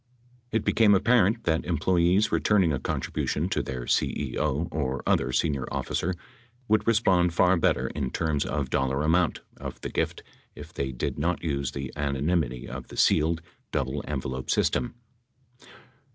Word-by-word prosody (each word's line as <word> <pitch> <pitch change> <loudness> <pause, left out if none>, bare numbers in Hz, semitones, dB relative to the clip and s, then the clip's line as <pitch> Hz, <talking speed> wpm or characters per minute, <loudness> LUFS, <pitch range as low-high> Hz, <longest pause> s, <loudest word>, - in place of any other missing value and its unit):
It 110 -1 0
became 105 -3 +5
apparent 115 +1 +3
that 80 -3 +1
employees 90 +4 +2
returning 95 -7 +3
a 70 - -1
contribution 80 +7 -2
to - - 0
their 65 -2 -5
CEO 75 +5 0
or 70 -4 -2
other - - +2
senior 70 -4 0
officer 90 +2 -2 0.5
would 110 +1 +2
respond 95 -7 +3
far 90 +1 +5
better 85 - +1
in 70 -3 -3
terms 80 0 0
of - - -3
dollar 65 +2 0
amount 85 +2 +2 0.2
of - - -7
the - - -4
gift - - -2 0.3
if - - -11
they 65 -1 -2
did 60 +3 -3
not 85 +4 -1
use 70 -4 -2
the 70 -1 -5
anonymity 70 -2 -1
of 65 -1 -7
the - - -11
sealed, 80 +2 +3 0.3
double 70 +2 -2
envelope 65 -3 -4
svstem. 120 - +1
80 Hz, 150 wpm, -27 LUFS, 70-90 Hz, 0.5 s, became